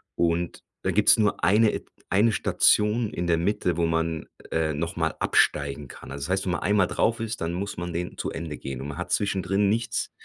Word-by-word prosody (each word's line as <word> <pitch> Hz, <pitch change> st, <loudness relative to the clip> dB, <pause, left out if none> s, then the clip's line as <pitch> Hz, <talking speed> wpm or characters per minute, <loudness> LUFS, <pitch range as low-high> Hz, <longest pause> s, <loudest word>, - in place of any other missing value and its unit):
Und 85 Hz, 0 st, 0 dB, 0.2 s
da -, -, +1 dB
gibt's -, -, +5 dB
nur 105 Hz, -5 st, +1 dB
eine 105 Hz, +5 st, +5 dB
Et -, -, -5 dB, 0.2 s
eine 105 Hz, +4 st, +4 dB
Station 105 Hz, +1 st, +2 dB
in 85 Hz, -, -3 dB
der 85 Hz, -1 st, +2 dB
Mitte, 90 Hz, -1 st, 0 dB
wo 85 Hz, -, +2 dB
man, 80 Hz, -1 st, -1 dB, 0.2 s
äh, 80 Hz, -1 st, 0 dB
noch 80 Hz, +3 st, -3 dB
mal 80 Hz, -1 st, -1 dB
absteigen 70 Hz, -1 st, +1 dB
kann. -, -, -11 dB
Also 70 Hz, 0 st, -5 dB
das -, -, -8 dB
heißt, 95 Hz, 0 st, 0 dB
wenn 90 Hz, -, 0 dB
man -, -, -2 dB
einmal 100 Hz, 0 st, +3 dB
drauf 115 Hz, 0 st, +1 dB
ist, 115 Hz, -4 st, -4 dB
dann 85 Hz, +1 st, -1 dB
muss 100 Hz, +2 st, -4 dB
man 85 Hz, 0 st, -4 dB
den 90 Hz, +1 st, -4 dB
zu -, -, -3 dB
Ende 80 Hz, -2 st, -5 dB
gehen 65 Hz, -2 st, -6 dB
und 70 Hz, -, -5 dB
man 70 Hz, -, -7 dB
hat 90 Hz, -, -5 dB
zwischendrin 100 Hz, 0 st, +1 dB
nichts 115 Hz, +1 st, -1 dB
90 Hz, 225 wpm, -26 LUFS, 80-105 Hz, 0.2 s, gibt's